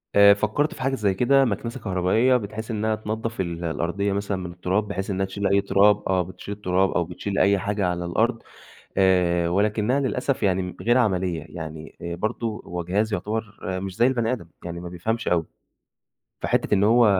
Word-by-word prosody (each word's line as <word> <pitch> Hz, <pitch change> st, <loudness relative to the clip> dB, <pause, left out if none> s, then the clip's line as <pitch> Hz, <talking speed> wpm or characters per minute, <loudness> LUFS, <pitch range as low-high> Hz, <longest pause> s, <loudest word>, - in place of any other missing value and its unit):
آآ، 100 Hz, 0 st, +8 dB
فكرت 110 Hz, +9 st, 0 dB
في -, -, -10 dB
حاجة 135 Hz, +1 st, +1 dB
زي 105 Hz, -6 st, +1 dB
كده، 135 Hz, +7 st, +4 dB
مكنسة 115 Hz, +3 st, -3 dB
كهربائية، 110 Hz, +6 st, +2 dB
بت 105 Hz, -4 st, -6 dB
حيث 110 Hz, +2 st, -5 dB
إنها 110 Hz, 0 st, 0 dB
تنضف 110 Hz, 0 st, -3 dB
ال 85 Hz, -1 st, -4 dB
الأرضية 85 Hz, +4 st, -1 dB
مثلًا 100 Hz, 0 st, -2 dB
من 90 Hz, -2 st, -5 dB
التراب، 95 Hz, +4 st, -1 dB
بحيث 100 Hz, -1 st, -4 dB
إنها 95 Hz, 0 st, 0 dB
تشيل 100 Hz, +1 st, -2 dB
أي 100 Hz, +1 st, +3 dB
تراب، 100 Hz, +1 st, +4 dB
آه، 95 Hz, -1 st, +2 dB
بتشيل 95 Hz, +3 st, -7 dB
التراب، 95 Hz, -1 st, +1 dB
أو 85 Hz, -, +1 dB
بتشيل 95 Hz, +3 st, -5 dB
أي 100 Hz, 0 st, +4 dB
حاجة 100 Hz, 0 st, -1 dB
على 90 Hz, 0 st, -2 dB
الأرض. 115 Hz, +7 st, 0 dB, 0.6 s
آآ، 90 Hz, -3 st, +3 dB
ولكنها 105 Hz, +7 st, +1 dB
للأسف 130 Hz, -1 st, -1 dB
يعني 95 Hz, -2 st, 0 dB
غير 120 Hz, +2 st, +4 dB
عملية 90 Hz, -8 st, 0 dB
يعني 80 Hz, 0 st, -8 dB
آآ، 85 Hz, 0 st, -4 dB
برضو 110 Hz, +4 st, -3 dB
هو 90 Hz, 0 st, -4 dB
جهاز 105 Hz, +5 st, 0 dB
يعتبر 105 Hz, +2 st, -3 dB
مش 95 Hz, 0 st, -4 dB
زي 120 Hz, -, +4 dB
البني 120 Hz, -2 st, +1 dB
آدم، 105 Hz, -10 st, -5 dB, 0.2 s
يعني 85 Hz, 0 st, -5 dB
ما 90 Hz, -, -6 dB
بيفهمش 110 Hz, +7 st, -2 dB
أوي. 85 Hz, -2 st, +2 dB, 1.0 s
فحِتّة -, -, +1 dB
إن 100 Hz, 0 st, +3 dB
هو 115 Hz, +2 st, +5 dB
100 Hz, 190 wpm, -24 LUFS, 90-110 Hz, 1.0 s, آآ